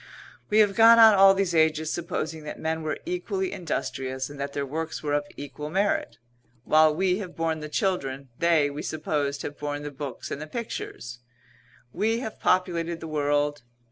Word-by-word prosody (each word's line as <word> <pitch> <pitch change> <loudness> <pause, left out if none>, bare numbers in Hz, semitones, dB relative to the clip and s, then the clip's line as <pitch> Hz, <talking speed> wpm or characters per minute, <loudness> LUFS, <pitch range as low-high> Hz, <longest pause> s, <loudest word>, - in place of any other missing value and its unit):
We 210 - +2
have 205 -2 +3
gone 230 +2 +7
on 225 -1 +9
all 195 0 +7
these 195 -3 0
ages 160 -1 +2
supposing 160 -2 -4
that 150 - -6
men 160 0 -2
were 155 -1 -3
equally 190 +1 -2
industrious, 135 -7 -4
and 145 - -11
that 140 0 -4
their 140 - -2
works 160 +4 -4
were 145 -1 -1
of 145 0 +1
equal 145 +1 -7
merit. 190 - 0 0.5
While 155 +1 +4
we 185 +2 +1
have 185 -4 -7
borne 165 -1 -1
the 150 0 -7
children, 140 -7 -2
they, 160 -4 +3
we 145 +1 -6
supposed, 150 -2 -2
have 145 - -7
borne 145 0 -4
the 145 - -5
books 140 -1 -7
and 145 - -4
the 155 - -6
pictures. 140 - -6 0.7
We 225 +2 +1
have 220 -3 -6
populated 170 -2 0
the 165 - -7
world. 145 -1 0
155 Hz, 180 wpm, -26 LUFS, 145-185 Hz, 0.7 s, on